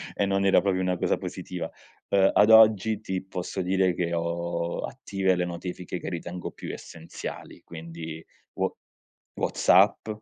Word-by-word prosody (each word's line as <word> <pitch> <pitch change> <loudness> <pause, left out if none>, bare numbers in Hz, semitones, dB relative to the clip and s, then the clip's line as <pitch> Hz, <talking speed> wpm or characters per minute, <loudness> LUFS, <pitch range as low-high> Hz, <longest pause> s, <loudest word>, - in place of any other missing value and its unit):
e 100 - +1
non 100 0 +1
era 95 - +5
proprio 95 -2 0
una 90 -1 0
cosa - - +1
positiva. - - -5 0.4
Ehm, 95 -1 +4
ad 105 +2 +5
oggi, 110 -1 +6
ti 95 -3 -3
posso 95 0 -4
dire 95 -1 +2
che 85 -1 -1
ho 85 0 -2
attive 95 -2 -1
le 90 0 0
notifiche 90 +1 -5
che - - -5
ritengo 85 +1 -5
più - - -7
essenziali 80 0 -9
quindi, 80 -1 -8 0.3
Wha - - 0 0.7
WhatsApp. 100 +4 +3
90 Hz, 145 wpm, -26 LUFS, 85-95 Hz, 0.7 s, oggi